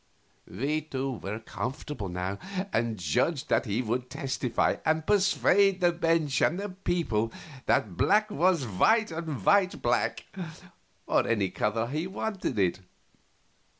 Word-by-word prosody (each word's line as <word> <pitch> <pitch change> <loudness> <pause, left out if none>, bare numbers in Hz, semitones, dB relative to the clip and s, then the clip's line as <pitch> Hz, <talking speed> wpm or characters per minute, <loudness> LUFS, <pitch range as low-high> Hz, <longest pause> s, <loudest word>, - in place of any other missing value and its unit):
We 145 - -1
two 135 -4 -3
were 100 +3 -4
comfortable 120 -1 -5
now, 90 +3 -3 0.3
and 115 -1 0
judged 130 - 0
that - - +2
he 110 +5 0
would 125 +2 -2
testify 130 -3 0
and 160 0 +1
persuade 195 0 +3
the 175 -2 +4
bench 165 -5 +1
and 175 - +2
the 205 +1 -3
people 170 - -1 0.4
that 90 -5 +1
black 210 +1 +3
was 175 -3 +2
white 215 - +3
and 160 -4 -5
white 200 -2 +4
black, 120 0 0 0.8
or - - +2
any 105 -5 +1
other 105 +2 0
color - - -3
he 155 +5 -2
wanted 195 - -3
it. 90 -2 +2
140 Hz, 140 wpm, -28 LUFS, 115-175 Hz, 0.8 s, the